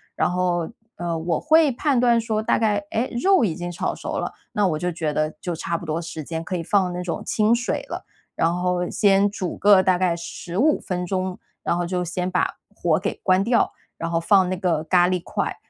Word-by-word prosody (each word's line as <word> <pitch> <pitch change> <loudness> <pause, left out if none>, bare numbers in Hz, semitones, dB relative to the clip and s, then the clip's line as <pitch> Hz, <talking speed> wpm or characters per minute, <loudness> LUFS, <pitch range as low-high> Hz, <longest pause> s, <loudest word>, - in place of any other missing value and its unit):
然 - - +1
后， 180 -2 0 0.3
呃， 170 -1 -2
我 160 0 -1
会 315 -1 +4
判 270 +2 0
断 240 -1 +4
说 220 -1 -1
大 - - +2
概， 210 -2 +1
哎， 235 +3 0
肉 380 -10 +5
已 170 -6 -1
经 175 0 -5
炒 175 - -2
熟 - - -4
了， - - -4 0.2
那 205 -2 +2
我 155 -4 0
就 175 +3 -2
觉 160 -3 -2
得 155 +1 0
就 175 -2 -3
差 170 +1 -2
不 170 - -9
多 160 +1 -2
时 165 -2 -6
间 165 +1 -4
可 180 +2 -3
以 - - -3
放 190 0 +2
那 180 0 -4
种 180 -1 -4
清 215 +2 +2
水 245 +1 -2
了， - - -6 0.3
然 165 +1 +2
后 180 0 -1
先 200 -1 +3
煮 185 -4 -4
个 200 -2 +6
大 185 -1 +3
概 180 -1 +2
15 180 - 0
分 180 -1 -4
钟， 185 0 -2 0.2
然 170 - 0
后 175 - -1
就 180 0 -1
先 180 +1 -2
把 180 0 0 0.2
火 170 -4 +1
给 200 +2 -2
关 185 0 +4
掉， 235 0 +2 0.3
然 165 0 -4
后 165 - +1
放 185 +1 +4
那 185 - -2
个 170 -4 0
咖 175 +2 +4
喱 180 -1 -1
块。 - - -2
180 Hz, 235 characters per minute, -23 LUFS, 170-205 Hz, 0.3 s, 个